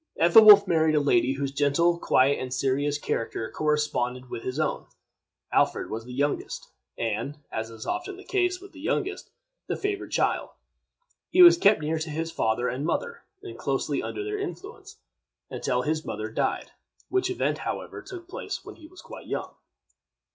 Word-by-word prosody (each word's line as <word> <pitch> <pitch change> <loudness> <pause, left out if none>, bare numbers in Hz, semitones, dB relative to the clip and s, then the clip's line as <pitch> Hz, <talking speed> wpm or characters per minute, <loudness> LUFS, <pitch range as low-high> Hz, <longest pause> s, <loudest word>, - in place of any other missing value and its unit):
Ethelwolf 205 +3 +9
married 160 -2 +3
a - - +4
lady 135 -2 +2
whose 140 0 -3
gentle, 150 +5 +2
quiet, 135 -1 +3
and 130 -1 -5
serious 140 +3 0
character 115 -5 -3
corresponded 145 -5 -1
with 115 - -5
his 130 +5 -4
own. 155 - -1 0.6
Alfred - - +1
was 115 +1 -5
the 125 - -10
youngest, 140 +3 -2 0.3
and, 115 +6 -3
as 110 0 -4
is 115 -1 -10
often 360 +1 -4
the 390 - -12
case 365 -2 0
with 390 +1 -13
the - - -14
youngest, 395 0 -2 0.4
the - - -1
favorite 405 0 -3
child. - - 0 0.8
He 365 - +7
was 345 0 +10
kept 210 - +4
near 155 +1 -1
to 155 0 -4
his 160 +2 -3
father 110 0 0
and 130 +3 -3
mother, 470 - -2 0.2
and 380 - -9
closely - - -1
under 410 - -4
their 420 0 -3
influence, 405 +2 -8 0.5
until 125 -1 -1
his 155 +2 -1
mother 110 0 -5
died, - - -2 0.4
which 380 0 +1
event, 375 - -1
however, - - -5
took 355 -2 -10
place 465 +7 -6
when - - -10
he 310 - -13
was 370 +3 -15
quite - - -11
young. - - -4
155 Hz, 170 wpm, -26 LUFS, -, 0.8 s, was